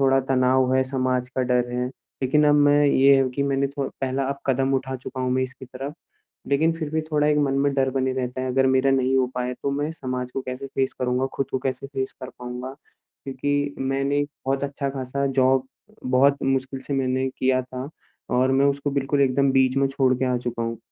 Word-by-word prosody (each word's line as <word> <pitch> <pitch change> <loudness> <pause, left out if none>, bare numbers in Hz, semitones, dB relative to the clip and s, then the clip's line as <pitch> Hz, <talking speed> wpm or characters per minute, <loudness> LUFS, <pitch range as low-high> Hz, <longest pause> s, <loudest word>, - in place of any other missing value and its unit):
थोड़ा 135 0 +4
तनाव 130 0 +3
है, 130 - +4
समाज 130 -1 -1
का 130 0 -2
डर 125 -1 +1
है 125 +1 -2 0.3
लेकिन 150 +4 +3
अब 145 - +5
मैं 145 0 +5
ये 140 0 +5
है 135 -1 +2
कि 140 +3 -2
मैंने 140 0 +1
थो 140 0 -3
पहला 135 0 -1
अब 140 - -3
कदम 135 0 +1
उठा 130 0 -2
चुका 130 +1 -7
हूँ 130 - 0
मैं 130 +1 +1
इसकी 130 0 -6
तरफ, 135 +3 -7 0.6
लेकिन 155 +4 +3
फिर 160 -2 -5
भी 160 - 0
थोड़ा 150 -1 +2
एक 150 0 +3
मन 140 -2 +1
में 140 - +2
डर 135 -1 +2
बने 130 0 0
रहता 130 0 -3
है 130 - -2
अगर 135 +1 +3
मेरा 130 +1 +3
नहीं 130 0 +2
हो 130 -1 +3
पाए 125 0 -2
तो 140 - 0
मैं 145 +2 -1
समाज 125 -4 -4
को 135 - -2
कैसे 130 +2 -6
फ़ेस 135 0 -1
करूँगा, 125 +1 +1
खुद 135 - -1
को 130 - 0
कैसे 130 0 -3
फ़ेस 135 -1 -4
कर 130 - -6
पाऊँगा। 125 +1 -6 0.5
क्योंकि 145 +1 -1
मैंने 135 +2 0 0.2
बहुत 135 +1 0
अच्छा-ख़ासा 140 -1 -3
जॉब 130 0 +2 0.4
बहुत 135 +2 +3
मुश्किल 135 0 -1
से 140 - -2
मैंने 130 0 0
किया 130 0 +2
था 130 +1 -7 0.4
और 130 +1 +2
मैं 135 +1 +4
उसको 140 0 0
बिल्कुल 140 +1 +1
एकदम 135 +1 +3
बीच 130 0 +3
में 135 0 +3
छोड़ 135 -1 +2
के 130 - 0
आ - - +1
चुका 120 -1 -3
हूँ 115 0 -3
135 Hz, 220 wpm, -24 LUFS, 130-140 Hz, 0.6 s, अब